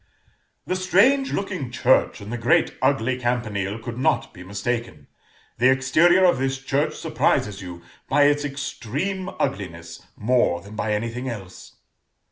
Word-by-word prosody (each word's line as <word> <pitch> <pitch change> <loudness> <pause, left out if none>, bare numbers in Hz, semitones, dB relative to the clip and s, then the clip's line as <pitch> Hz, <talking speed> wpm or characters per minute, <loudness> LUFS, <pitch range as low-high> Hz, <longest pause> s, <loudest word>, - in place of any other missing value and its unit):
"The 185 - -1
strange 205 +10 +3
looking 185 -10 -3
church, 130 -2 +2
and 105 +3 -7
the - - -2
great 115 - +2
ugly 130 -1 +1
campanile, 110 -5 -2
could 115 +1 -7
not 135 0 +1
be 90 - -12
mistaken. 100 -5 -4 0.5
The 125 +2 +5
exterior 155 +8 +4
of 175 -7 +3
this 135 0 -1
church 140 +2 -1
surprises 100 -1 0
you 90 -2 -9 0.3
by 145 +1 +4
its 145 0 +3
extreme 145 - -4
ugliness, 85 -3 -4 0.2
more 115 -6 +2
than 100 +4 -12
by 105 0 -1
anything 115 +4 -3
else." 95 -6 -9
125 Hz, 140 wpm, -23 LUFS, 105-145 Hz, 0.5 s, The